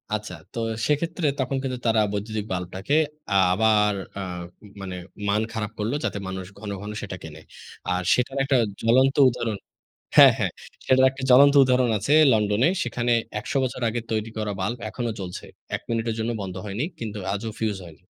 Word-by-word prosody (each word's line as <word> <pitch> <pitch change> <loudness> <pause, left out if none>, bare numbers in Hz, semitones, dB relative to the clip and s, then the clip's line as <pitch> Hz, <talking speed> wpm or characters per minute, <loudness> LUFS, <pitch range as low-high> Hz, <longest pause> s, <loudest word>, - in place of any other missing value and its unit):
আচ্ছা, 105 0 -6 0.2
তো - - -8 0.3
সেক্ষেত্রে 165 +3 0
তখন 130 +1 -1
কিন্তু 130 -2 -2
তারা 110 -1 +3
বৈদ্যুতিক 105 +1 -3
বাল্বটাকে 95 +8 -2 0.4
আ - - +2 0.2
আবার 105 0 +3 0.2
অ্যাঁ 90 -3 -5 0.4
মানে 95 -1 -5 0.3
মান 100 +1 +2
খারাপ 105 -2 -3
করল 105 +2 -1
যাতে - - -2
মানুষ 95 0 -5
ঘন, 105 0 -6
ঘন 105 +1 -6 0.3
কেনে। 80 -1 -10 0.5
আর 90 - 0
সেটার 125 +2 0
একটা 135 -1 +2 0.2
জ্বলন্ত 130 +4 +4
উদাহরণ 115 -3 -3 0.6
হ্যাঁ - - +10
হ্যাঁ, - - 0 0.3
সেটার 130 0 +5
একটা 135 0 -10
জ্বলন্ত 140 +3 +7
উদাহরণ 125 -1 +3
আছে 110 +8 -1 0.2
লন্ডনে। 105 +4 +3
সেখানে 120 0 0 0.3
১০০ - - -6
বছর 130 0 -3
আগে 120 +2 -2
তৈরি 110 0 -1
করা 105 -1 -2
বাল্ব 115 +6 -1
এখনো 120 -2 -3
জ্বলছে। 90 -2 -6 0.3
১ - - -13
মিনিটের 115 -1 -1
জন্য 115 +1 -1
বন্ধ 95 -2 -5
হয়নি। 105 +6 -3
কিন্তু 110 -2 -5
আজও 105 +3 -3
ফিউজ 110 -3 -1
হয়নি। 80 -4 -16
110 Hz, 170 wpm, -24 LUFS, 100-125 Hz, 0.6 s, হ্যাঁ